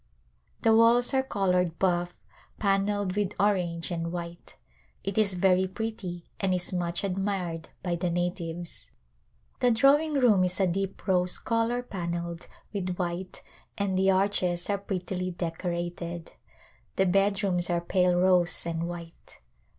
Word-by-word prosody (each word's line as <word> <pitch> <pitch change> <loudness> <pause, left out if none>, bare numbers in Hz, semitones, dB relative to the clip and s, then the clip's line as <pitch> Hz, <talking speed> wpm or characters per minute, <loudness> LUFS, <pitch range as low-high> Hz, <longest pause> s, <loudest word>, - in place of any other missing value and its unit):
The 225 -2 +5
walls 235 +3 +5
are 265 - +4
colored 180 -8 0
bufF, 175 -2 +1 0.5
panelled 200 -1 +1
with 205 -1 -1
orange 180 -4 +1
and 165 -1 -2
white. 170 -1 -7 0.5
It 195 0 -3
is 205 -3 +3
very 185 0 +3
pretty 190 -4 -5
and 190 -2 +1
is 180 +1 0
much 175 0 -2
admired 190 -4 -2
by 175 -2 -1
the 175 +1 -1
natives. 175 -1 -3 0.7
The 250 - +4
drawing 285 +6 +4
room 230 -9 +5
is 180 +1 0
a 195 - +4
deep 195 +2 -2
rose 180 -1 +2
color 230 +2 0
panelled 170 -5 -4 0.3
with 185 -3 -2
white 180 +1 -4 0.3
and 200 -2 0
the 190 +1 +3
arches 185 -2 +1
are 200 - 0
prettily 185 -2 -3
decorated. 170 0 -4 0.6
The 190 - +3
bedrooms 195 -1 +2
are 175 -1 +2
pale 180 +1 +2
rose 180 -2 +3
and 165 0 -2
white. 170 -1 -9
185 Hz, 135 wpm, -28 LUFS, 175-200 Hz, 0.7 s, The